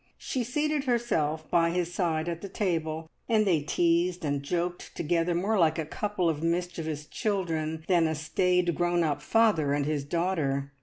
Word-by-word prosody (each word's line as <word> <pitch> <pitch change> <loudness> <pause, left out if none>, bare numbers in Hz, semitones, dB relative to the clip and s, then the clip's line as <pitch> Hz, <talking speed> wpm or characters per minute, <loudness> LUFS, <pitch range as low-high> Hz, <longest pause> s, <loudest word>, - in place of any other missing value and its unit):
She 255 - -2
seated 295 +4 -1
herself 160 - 0
by 170 -1 +4
his 175 0 -1
side 165 -3 0
at 170 -1 -3
the 200 - -6
table, 160 -5 -2 0.2
and 215 -2 +3
they 170 -6 +3
teased 170 +3 +1
and 140 -1 0
joked 175 +4 -3
together 170 +1 0
more 200 +4 +1
like 160 -2 +3
a 160 - -2
couple 180 +4 -1
of 155 -2 0
mischievous 165 -3 -2
children 160 -6 -2
than 175 -3 +4
a 160 - -1
staid, 180 +3 +1
grown 175 +1 +1
up 150 -3 -1
father 205 -11 +3
and 145 -1 0
his 150 -1 -1
daughter. 145 -4 -1
170 Hz, 170 wpm, -28 LUFS, 155-180 Hz, 0.2 s, by